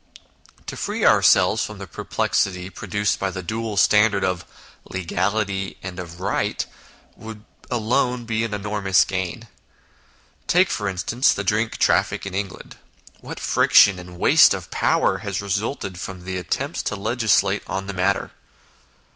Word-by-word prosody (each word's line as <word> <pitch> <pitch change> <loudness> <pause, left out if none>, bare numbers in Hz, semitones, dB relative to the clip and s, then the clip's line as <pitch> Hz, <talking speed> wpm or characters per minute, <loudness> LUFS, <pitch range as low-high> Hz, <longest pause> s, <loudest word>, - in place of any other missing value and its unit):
To - - -6
free - - -2
ourselves - - +4
from - - -6
the - - -7
perplexity 90 -1 -2
pro 105 - -9
duced 105 +1 0
by 95 - -1
the 95 0 -6
dual 110 +2 -4
standard 105 0 +4
of 90 -2 -1 0.4
legality 95 +2 -2
and 90 -1 -6
of 85 -1 -8
right, 95 - -1 0.5
would 110 -1 -10 0.2
alone 125 +1 0
be 115 -1 -1
an 115 - -3
enormous 105 -2 +1
gain. 95 +5 -4 1.0
Take, 180 +2 +3
for 105 -2 -2
instance, 120 +9 +1
the 100 - -3
drink 110 +3 0
traffic - - +1
in 100 - -6
England; 95 0 -5 0.4
what - - -8
friction 95 -2 +5
and 90 0 -11
waste - - +6
of - - -9
power - - +1
has 100 -2 -4
resulted 100 -1 -3
from 95 -2 -7
the 95 -1 -3
attempts 90 - -3
to - - -3
legislate 110 +2 +1
on 95 +1 -3
the 100 - -5
matter. 95 +1 0
100 Hz, 145 wpm, -22 LUFS, 95-110 Hz, 1.0 s, waste